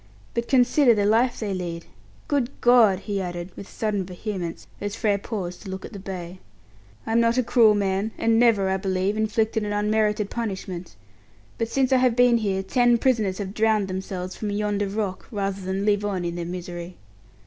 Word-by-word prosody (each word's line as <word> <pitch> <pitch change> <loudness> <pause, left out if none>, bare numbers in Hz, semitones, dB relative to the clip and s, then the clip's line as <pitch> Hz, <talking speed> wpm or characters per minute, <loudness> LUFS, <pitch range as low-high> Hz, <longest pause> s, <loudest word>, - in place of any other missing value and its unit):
"But 235 0 -2
consider 250 -1 +4
the 205 -1 +1
life 230 +4 +2
they 205 -3 -2
lead. 170 -2 -4 0.4
Good 275 -5 +1
God!" 225 -6 +5
he 200 -2 -2
added, 175 0 -5
with 200 - -9
sudden 210 -3 -1
vehemence, 180 -1 -5 0.2
as 205 +1 -3
Frere 210 -3 +1
paused 185 -5 -5
to 195 - -9
look 190 0 -6
at - - -10
the 200 - -7
bay. 185 -1 -7 0.7
"I'm 225 +1 +2
not 230 +1 +3
a 255 - +3
cruel 225 -3 +5
man, 195 +1 0
and 225 0 +2
never, 225 -5 +4
I 190 - +1
believe, 190 +1 -1
inflicted 220 0 0
an 205 0 -2
unmerited 210 0 +1
punishment, 190 -6 -5 0.6
but 230 - 0
since 265 +2 +1
I - - +6
have 250 -2 +3
been 245 -1 +5
here 195 -3 -1
ten 240 +4 +3
prisoners 220 -7 +1
have 195 -2 -5
drowned 215 -2 +2
themselves 185 -1 -5
from 210 - -4
yonder 205 0 -1
rock, 195 -2 -3
rather 200 -2 -2
than 190 +2 -2
live 205 -1 +2
on 190 -4 -2
in 170 - -2
their 170 0 -4
misery. 175 0 -6
205 Hz, 190 wpm, -24 LUFS, 190-225 Hz, 0.7 s, I